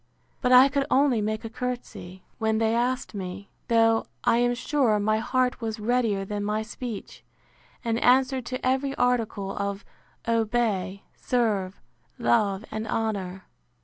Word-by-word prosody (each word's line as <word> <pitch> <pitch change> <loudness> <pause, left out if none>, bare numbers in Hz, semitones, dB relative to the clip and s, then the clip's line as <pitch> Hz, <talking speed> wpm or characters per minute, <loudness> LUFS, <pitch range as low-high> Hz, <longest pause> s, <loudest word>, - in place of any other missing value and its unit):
But 250 - +1
I 255 +2 +9
could 280 0 -1
only 265 -5 +3
make 215 +1 -2
a - - -4
courtesy, 240 -7 -6 0.2
when 220 -1 +1
they 225 0 +2
asked 245 +2 0
me; 195 0 -6 0.2
though, 225 -1 +3 0.2
I - - +3
am 245 0 +2
sure, 240 -4 +1
my 215 +1 +1
heart 255 +2 0
was 220 -1 -3
readier 220 -3 +1
than 205 +1 -3
my 210 +1 -1
speech, 220 0 -7 0.6
and 230 0 0
answered 260 0 +3
to 255 +1 -4
every 265 +2 +1
article 225 -6 0
of 200 0 -3 0.4
obey, 220 -4 0
serve, 210 -7 -1 0.4
love, 195 - +1
and 220 +1 -4
honour. 195 -5 -2
225 Hz, 145 wpm, -26 LUFS, 205-250 Hz, 0.6 s, I